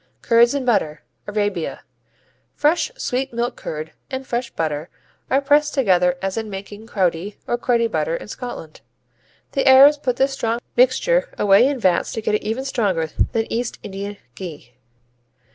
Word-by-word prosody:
Curds 235 +3 +4
and 275 -2 -2
butter 155 - 0 0.2
Arabia 205 -5 -2 0.7
Fresh 310 +8 +2
sweet 265 - -2
milk 235 +1 -2
curd 155 0 -6 0.2
and 265 0 -5
fresh 240 -1 -2
butter 155 -2 -3 0.4
are 270 - +3
pressed 290 +1 +3
together 180 -8 +3
as 195 +2 -2
in 220 -1 -3
making 205 +2 -8
Crowdie 190 -1 -1
or - - 0
Cruddy 240 -1 +1
butter 160 -5 -1
in - - -7
Scotland. 210 -9 -8 0.7
The 275 -1 0
Arabs 275 +3 +8
put 255 -4 -1
this 270 +1 +1
strong 230 -3 -1 0.2
mixture - - +3
away 200 +5 +5
in 280 -1 -1
vats 185 -5 +1
to 225 - -3
get 215 - 0
it 210 - +1
even 230 +5 -3
stronger 190 - 0 0.2
than 225 -1 +1
East 240 +1 -2
Indian 200 +1 -6 0.2
ghee. 150 -5 -9
225 Hz, 160 wpm, -21 LUFS, 185-260 Hz, 0.7 s, Arabs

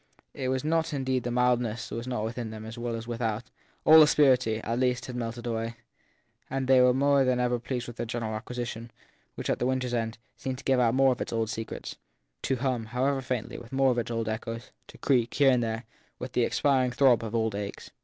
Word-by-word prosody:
It 130 - -3
was 130 0 0
not 160 +1 0
indeed 130 -2 0
that 120 - -3
the - - -3
mildness 120 -2 +1
was 115 +2 -4
not 125 -4 -2
within 115 +1 -4
them 110 0 -8
as 110 +1 -7
well 120 -1 -3
as 115 0 -6
without; 115 -1 -3 0.3
all 160 0 +9
asperity, 130 -7 +4
at 115 +1 -1
least, 125 0 +1
had 125 - -7
melted 120 0 -4
away; 115 0 -2 0.7
they 130 -1 +3
were 125 0 +6
more 140 +1 +3
than 130 -1 +1
ever 125 -1 +1
pleased 120 0 -4
with 120 - -9
their 120 - -2
general 115 -1 -3
acquisition, 115 +1 -5 0.5
which, - - -5
at - - 0
the 125 - +1
winter 130 0 0
s - - -5
end, 115 -1 -1 0.2
seemed 130 -1 -4
to 135 - -11
give 130 -1 +2
out 120 -1 +3
more 135 0 +5
of 125 - -3
its - - -3
old 115 -1 -1
secrets, 115 0 -6 0.4
to 135 - 0
hum, 125 -3 -1
however 130 +4 0
faintly, 125 -3 -4
with 120 - -13
more 135 -1 +3
of 120 - 0
its 120 - -3
old 115 -1 -2
echoes, 115 +2 -5 0.2
to - - -14
creak, 120 -4 +1
here 140 -1 +5
and 125 -1 +2
there, 115 0 -2 0.3
with 125 0 -6
the 120 -2 +2
expiring 130 -3 +2
throb 125 -2 +4
of 110 0 -4
old 110 -2 +1
aches. 100 0 -6
125 Hz, 230 wpm, -28 LUFS, 115-130 Hz, 0.7 s, all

